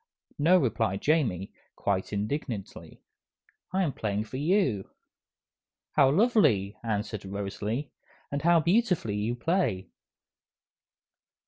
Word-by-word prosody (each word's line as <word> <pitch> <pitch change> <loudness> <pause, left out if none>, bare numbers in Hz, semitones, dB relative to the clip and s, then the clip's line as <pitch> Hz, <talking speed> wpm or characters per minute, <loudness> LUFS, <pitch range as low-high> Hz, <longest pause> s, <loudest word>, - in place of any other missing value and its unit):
"No," 170 +5 +5
replied 110 - 0
Jamie, 125 - +1 0.2
quite 95 -2 -1
indignantly, 105 +1 -4 0.7
"I'm 185 -7 0
playing 105 -1 -2
for 120 +4 -7
you." 145 - +1 1.0
"How 135 -3 +5
lovely," 150 - +3
answered 110 -2 -3
Rosalie, 100 +7 -4 0.4
"and 145 0 -2
how 170 0 +5
beautifully 175 - +1
you 110 +4 -1
play!" 145 - 0
120 Hz, 95 wpm, -28 LUFS, 100-165 Hz, 1.0 s, No